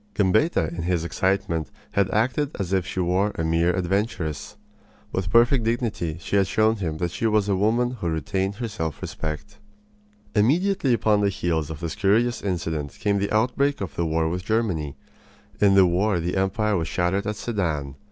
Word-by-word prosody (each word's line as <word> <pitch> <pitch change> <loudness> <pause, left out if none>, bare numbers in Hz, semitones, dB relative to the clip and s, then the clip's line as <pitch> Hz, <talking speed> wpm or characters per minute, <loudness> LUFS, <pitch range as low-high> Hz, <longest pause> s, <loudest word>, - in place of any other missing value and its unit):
Gambetta 100 - +2
in 85 0 -5
his 85 -1 0
excitement 85 -3 -1 0.2
had 100 -1 +1
acted 125 +7 +1
as 95 -1 -2
if 95 -2 +1
she - - -4
were 95 +4 +1
a 80 - -2
mere 85 +2 +2
adventuress. 95 -3 -2 0.6
With 95 -2 -2
perfect 120 +5 +4
dignity 110 -9 -1
she 100 +2 -1
had 95 -1 +3
shown 110 +3 +2
him 80 -6 -3
that 85 +1 -2
she 115 - -1
was 105 -2 +2
a 100 - +2
woman 115 +5 +2
who 100 -9 -3
retained 95 +6 -1
her 120 +2 -3
self 80 -9 -4
respect. 75 0 -6 0.7
Immediately 150 - +2
upon 105 -2 +2
the 100 - +3
heels 85 -6 -1
of 80 0 -7
this 85 -2 -3
curious 110 +4 +2
incident 80 -6 -3
came 100 -1 +1
the 100 - -1
outbreak 125 +6 +1
of 100 - -5
the 85 - -1
war 80 0 +1
with 90 +2 -3
Germany. 95 -10 -1 0.6
In 100 -1 +5
the 95 -1 +7
war 90 +2 +1
the 85 +2 -2
empire 100 +3 +1
was 80 -1 -2
shattered 95 +4 0
at 105 - -1
Sedan. 85 - -2
95 Hz, 180 wpm, -24 LUFS, 85-110 Hz, 0.7 s, the